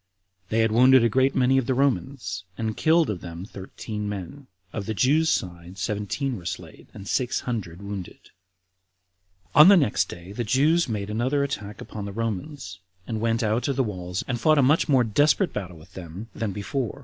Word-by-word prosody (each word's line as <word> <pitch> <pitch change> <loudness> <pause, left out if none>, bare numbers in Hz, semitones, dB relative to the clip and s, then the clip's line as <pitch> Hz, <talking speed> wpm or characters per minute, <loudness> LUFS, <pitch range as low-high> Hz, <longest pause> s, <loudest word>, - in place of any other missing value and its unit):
They 110 +1 +2
had 110 -1 +2
wounded 130 +2 +6
a 115 - +4
great 130 +4 +2
many 130 +1 +4
of 130 - -3
the 130 - +1
Romans, 135 -7 -1
and 110 -1 -2
killed 160 +1 +3
of 95 -5 -3
them 85 +1 -7
thirteen 105 +1 -6
men; 115 +8 -7 0.3
of 100 -3 -4
the 110 - -2
Jews' 150 +9 +3
side 90 - -3
seventeen 105 +7 -2
were 90 - -12
slain, - - -7
and 100 - -10
six 125 +2 0
hundred 100 -7 -5
wounded. 100 -3 -6
6. - - -20 1.2
On 150 +3 +9
the 200 0 +8
next 105 - +1
day 85 +2 -9
the 120 +4 -3
Jews 150 +7 +2
made 105 -2 -3
another 130 +6 +1
attack 105 -7 -5
upon 105 -2 -7
the 100 - -5
Romans, 110 - -4 0.3
and 110 -2 -4
went 115 +1 +1
out 110 +3 0
of 140 - 0
the 135 - +2
walls 90 -4 -4
and 120 -2 -2
fought 155 +5 +4
a 140 - +5
much 150 +5 +3
more 130 -3 +5
desperate 130 +4 +2
battle 90 -4 -5
with 85 +4 -17
them 95 +5 -8
than 110 -3 -3
before. 115 +6 -3
115 Hz, 195 wpm, -25 LUFS, 100-135 Hz, 1.2 s, On